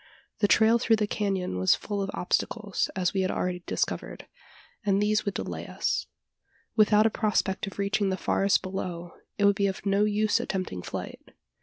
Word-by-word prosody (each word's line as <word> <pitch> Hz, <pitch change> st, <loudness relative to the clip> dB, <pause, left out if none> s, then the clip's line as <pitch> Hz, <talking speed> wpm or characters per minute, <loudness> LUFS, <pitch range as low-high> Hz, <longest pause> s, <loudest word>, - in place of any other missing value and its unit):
The 205 Hz, -, +3 dB
trail 225 Hz, +3 st, +5 dB
through 225 Hz, 0 st, +3 dB
the 215 Hz, -1 st, 0 dB
canon 195 Hz, -, -2 dB
was 95 Hz, -, +4 dB
full 205 Hz, -1 st, -4 dB
of 195 Hz, -, -2 dB
obstacles, 205 Hz, +2 st, -1 dB
as 185 Hz, 0 st, 0 dB
we 195 Hz, -, +1 dB
had 185 Hz, -, 0 dB
already 180 Hz, -1 st, -2 dB
discovered -, -, -3 dB, 0.6 s
and 200 Hz, -1 st, +2 dB
these 210 Hz, +1 st, +1 dB
would 200 Hz, -, -2 dB
delay -, -, -4 dB
us. -, -, -1 dB, 0.7 s
Without 215 Hz, -1 st, +5 dB
a 225 Hz, -, +3 dB
prospect 205 Hz, -3 st, 0 dB
of 195 Hz, -, -8 dB
reaching 200 Hz, 0 st, +1 dB
the 190 Hz, -, -1 dB
forest 195 Hz, +1 st, +2 dB
below 180 Hz, -2 st, -5 dB, 0.2 s
it 205 Hz, -, +2 dB
would 200 Hz, 0 st, +5 dB
be 200 Hz, 0 st, +1 dB
of 195 Hz, +1 st, -5 dB
no 200 Hz, +1 st, +3 dB
use 210 Hz, 0 st, +2 dB
attempting 185 Hz, -, -3 dB
flight. -, -, -6 dB
200 Hz, 180 wpm, -27 LUFS, 190-210 Hz, 0.7 s, trail